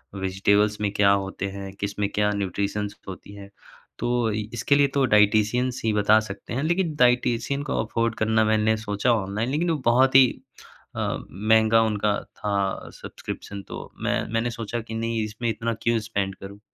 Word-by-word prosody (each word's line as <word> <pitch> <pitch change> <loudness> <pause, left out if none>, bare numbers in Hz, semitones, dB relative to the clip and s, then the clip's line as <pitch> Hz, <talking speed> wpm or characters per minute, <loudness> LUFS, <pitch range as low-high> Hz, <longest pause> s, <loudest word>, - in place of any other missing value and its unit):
Vegetables 100 +2 +1
में 100 -1 0
क्या 100 -1 +4
होते 95 0 -1
हैं, 100 0 -7
किसमें 100 0 -2
क्या 105 0 +2
न्यूट्रिशंस 100 +1 -2
होती 95 +1 -9
हैं 100 0 -11 0.5
तो 120 -1 0
अ, - - -1 0.2
इसके 120 +5 +2
लिए 140 0 +4
तो 135 - +4
डायटीशियन 110 +3 +3
ही 110 -1 +1
बता 105 +1 +4
सकते 100 +3 -9
हैं। 135 - -1
लेकिन 170 0 0
डायटीशियन 125 +2 +2
को - - 0
अफोर्ड 115 0 -1
करना 110 0 +2
मैंने 110 0 +2
सोचा 110 +2 0
ऑनलाइन 105 +2 -2
लेकिन 160 +5 0
वो 160 - +1
बहुत 130 +3 +4
ही, 135 -1 +9 0.7
अ, - - -1
महँगा 110 +3 +3
उनका 105 -1 +1
था 100 -2 -3
सब्सक्रिप्शन 100 -1 -8
तो - - -8
मैं - - +1
मैंने 115 +1 +1
सोचा 115 +1 -4
कि 115 0 -9
नहीं 115 0 -1
इसमें 110 +2 -3
इतना 115 +1 -2
क्यों 115 -1 +2
स्पेंड 95 -3 -2
करूँ 100 +1 -11
110 Hz, 170 wpm, -24 LUFS, 100-120 Hz, 0.7 s, ही